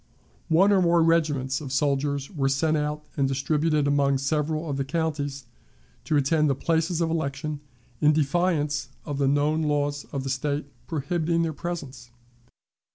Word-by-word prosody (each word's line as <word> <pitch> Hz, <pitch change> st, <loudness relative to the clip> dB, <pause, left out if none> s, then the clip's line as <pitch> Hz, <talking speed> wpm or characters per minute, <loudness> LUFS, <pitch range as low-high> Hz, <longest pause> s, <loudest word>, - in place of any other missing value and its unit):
One 190 Hz, +6 st, +5 dB
or 195 Hz, -2 st, +4 dB
more 170 Hz, -1 st, +4 dB
regiments 150 Hz, -5 st, +1 dB
of 135 Hz, -3 st, -6 dB
soldiers 140 Hz, +1 st, 0 dB
were 140 Hz, -7 st, 0 dB
sent 155 Hz, +4 st, +1 dB
out 150 Hz, 0 st, -2 dB
and 140 Hz, -2 st, +1 dB
distributed 150 Hz, +3 st, +1 dB
among 140 Hz, -1 st, +2 dB
several 155 Hz, +3 st, -1 dB
of 140 Hz, -2 st, -2 dB
the 135 Hz, -, 0 dB
counties 145 Hz, -2 st, -2 dB, 0.6 s
to 150 Hz, -, +2 dB
attend 150 Hz, +2 st, +2 dB
the 135 Hz, -, +2 dB
places 165 Hz, +3 st, 0 dB
of 165 Hz, -1 st, +1 dB
election, 150 Hz, -1 st, -2 dB, 0.4 s
in 150 Hz, -, +5 dB
defiance 150 Hz, 0 st, 0 dB, 0.2 s
of 145 Hz, -3 st, -4 dB
the 140 Hz, -, +2 dB
known 145 Hz, +3 st, +2 dB
laws 145 Hz, -1 st, 0 dB
of 140 Hz, -2 st, -5 dB
the 135 Hz, -, -2 dB
State 145 Hz, +2 st, -1 dB, 0.2 s
prohibiting 165 Hz, +2 st, 0 dB
their 160 Hz, -1 st, -1 dB
presence. 140 Hz, -8 st, -6 dB
150 Hz, 160 wpm, -25 LUFS, 140-160 Hz, 0.6 s, One